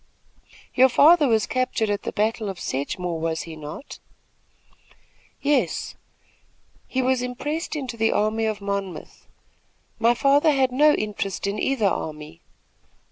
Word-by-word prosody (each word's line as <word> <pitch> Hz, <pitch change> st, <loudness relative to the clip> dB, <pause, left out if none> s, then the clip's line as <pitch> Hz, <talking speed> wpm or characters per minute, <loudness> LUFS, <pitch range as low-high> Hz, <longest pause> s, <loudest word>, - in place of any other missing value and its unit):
"Your 260 Hz, +1 st, +5 dB
father 300 Hz, +4 st, +6 dB
was 220 Hz, -3 st, +2 dB
captured 255 Hz, -4 st, -1 dB
at 205 Hz, 0 st, -1 dB
the -, -, -4 dB
battle 215 Hz, 0 st, -1 dB
of 190 Hz, -3 st, -6 dB
Sedgemore, 165 Hz, +5 st, -3 dB
was 160 Hz, 0 st, -2 dB
he 165 Hz, -1 st, -9 dB
not?" 155 Hz, -, -9 dB, 1.4 s
"Yes; 275 Hz, -, 0 dB, 0.9 s
he 260 Hz, 0 st, -1 dB
was 255 Hz, 0 st, +1 dB
impressed 290 Hz, +7 st, -4 dB
into 260 Hz, -5 st, -5 dB
the 225 Hz, 0 st, +2 dB
army 215 Hz, +1 st, +1 dB
of 215 Hz, -2 st, -2 dB
Monmouth. 200 Hz, -2 st, -5 dB, 0.7 s
My 230 Hz, +2 st, +4 dB
father 280 Hz, +5 st, +4 dB
had 265 Hz, -2 st, +2 dB
no 295 Hz, +4 st, +5 dB
interest 205 Hz, -3 st, -3 dB
in 200 Hz, +1 st, -2 dB
either 265 Hz, -6 st, 0 dB
army. 150 Hz, -, -3 dB
225 Hz, 135 wpm, -23 LUFS, 195-260 Hz, 1.4 s, father